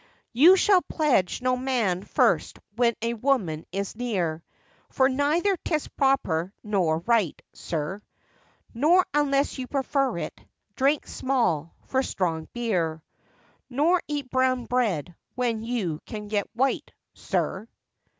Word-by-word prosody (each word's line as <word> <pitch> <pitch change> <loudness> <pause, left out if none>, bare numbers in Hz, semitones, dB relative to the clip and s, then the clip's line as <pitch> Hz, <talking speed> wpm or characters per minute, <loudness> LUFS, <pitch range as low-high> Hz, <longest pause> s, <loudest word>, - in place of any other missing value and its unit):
You 320 +10 +8
shall 380 -1 +5
pledge 260 - 0
no 255 0 +2
man 245 -8 0
first - - +1 0.2
when 235 -1 +2
a 230 0 0
woman 215 - 0
is 200 +1 -3
near, 185 -10 -2 0.5
For 260 - +3
neither 300 +9 +1
'tis 310 -2 -2
proper 190 - +1
nor 185 -7 +1
right, 220 -5 +1
sir; 165 +5 -4 0.7
Nor, 320 +10 +4
unless 280 -1 +1
you 255 - -4
prefer 275 -4 0
it, 155 -2 -6 0.3
drink 280 +2 +2
small 190 - -1
for 265 - +1
strong 165 -10 -2
beer, 175 -10 -1 0.7
Nor 315 +8 +2
eat 290 -4 -4
brown 255 -1 +1
bread 205 - 0 0.2
when 235 -3 -1
you 220 -10 -2
can 210 -1 -6
get 205 -2 -1
white, 265 +3 0 0.2
sir. 200 +4 -2
240 Hz, 125 wpm, -26 LUFS, 185-275 Hz, 0.7 s, You